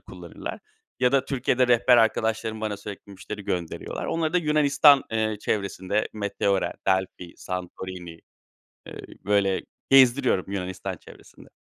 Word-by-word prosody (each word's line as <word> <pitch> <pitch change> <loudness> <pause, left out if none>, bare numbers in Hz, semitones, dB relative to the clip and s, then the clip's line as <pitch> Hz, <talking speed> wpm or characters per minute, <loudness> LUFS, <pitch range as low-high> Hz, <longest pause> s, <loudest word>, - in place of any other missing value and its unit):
kullanırlar - - -8 0.4
ya 125 +1 +3
da 135 - +3
Türkiye'de 130 -1 +1
rehber 120 +1 +5
arkadaşlarım 110 -1 +1
bana 105 -2 -2
sürekli 100 0 -10
müşteri 105 +1 -8
gönderiyorlar. 85 -3 -4
Onları 160 -1 -1
da 180 - +3
Yunanistan, 150 -3 +5
eee, 110 -1 0
çevresinde 100 0 -1
Meteora, 100 -2 -1
Delphi, 95 -2 -1
Santorini, 90 -2 -7 0.7
eee, - - -9 0.2
böyle 100 -2 +2 0.3
gezdiriyorum 130 -6 +5
Yunanistan 95 -2 -4
çevresinde. - - -16
105 Hz, 120 wpm, -25 LUFS, 95-125 Hz, 0.7 s, rehber